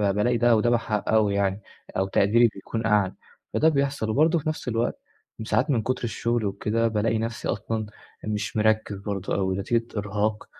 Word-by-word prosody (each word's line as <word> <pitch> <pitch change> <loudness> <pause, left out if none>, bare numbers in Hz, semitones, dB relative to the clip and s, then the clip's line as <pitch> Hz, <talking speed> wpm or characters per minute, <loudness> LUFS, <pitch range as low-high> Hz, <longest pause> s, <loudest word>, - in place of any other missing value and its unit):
بالاقي 120 +4 +2
ده 120 0 +4
وده 110 +2 +2
بحققه 110 -2 +1
يعني 100 0 0 0.4
أو 95 +1 +1
تقديري 110 +5 +4
بيكون 110 +3 -4
أعلى 105 -4 +2 0.4
فده 160 - +4
بيحصل، 140 -6 0
وبرضه 160 +8 +3
في 155 - -2
نفْس 155 - -5
الوقت 115 -1 -1 0.5
ساعات 130 +6 +1
من 125 -6 +2
كتر 130 +3 -2
الشغل 115 0 -1
وكده 110 +3 0
بالاقي 110 0 0
نفْسي 115 +1 -3
أصلًا 110 +2 -2 0.4
مش 105 0 -3
مركز 110 -1 +1
برضه 100 -2 -3
أو 95 -1 0
نتيجة 115 +5 -1
إرهاق 105 +1 -1
110 Hz, 165 wpm, -25 LUFS, 105-120 Hz, 0.5 s, ده